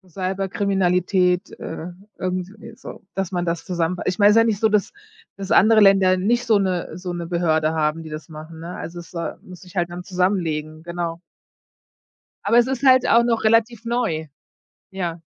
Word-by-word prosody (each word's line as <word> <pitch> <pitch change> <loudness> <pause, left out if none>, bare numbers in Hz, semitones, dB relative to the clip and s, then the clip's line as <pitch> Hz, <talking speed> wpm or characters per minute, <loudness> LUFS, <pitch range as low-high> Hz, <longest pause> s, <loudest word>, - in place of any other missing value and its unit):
Cyberkriminalität, 185 -1 0
äh, 160 +1 -6 0.3
irgendwie 185 +5 -5
so, 255 - -11
dass 195 -1 -2
man 175 -1 -1
das 170 -1 -3
zusammen 175 -1 -1
ich 185 +2 -1
meine, 205 0 +7
ist - - +3
ja 225 - +7
nicht 220 -3 0
so, 220 - +3
dass 210 -2 +1 0.5
dass 195 -1 -6
andere 220 +2 +6
Länder 195 -2 +5
nicht 235 +6 +1
so 225 -3 +4
'ne 180 -3 -2
so 180 -1 -5
'ne 170 -1 -5
Behörde 160 -2 +1
haben, 160 +1 -1
die 160 - -9
das 155 0 -7
machen, 155 +1 -10
ne? 170 +2 -7
Also, 175 +1 -7
es, 170 - -13
äh, 170 -1 -3
muss 180 -1 -13
sich 180 0 -15
halt 175 -1 0
dann 175 +1 -7
zusammenlegen, 165 -5 -1
genau. 170 -1 -4 1.3
Aber 235 - +4
es 240 0 +5
ist 265 0 -3
halt 260 -2 +5
auch 235 +1 +5
noch 230 -2 0
relativ 230 +1 +2
neu. 230 -10 -1 0.6
Ja. 175 -3 -4
185 Hz, 185 wpm, -22 LUFS, 170-205 Hz, 1.3 s, meine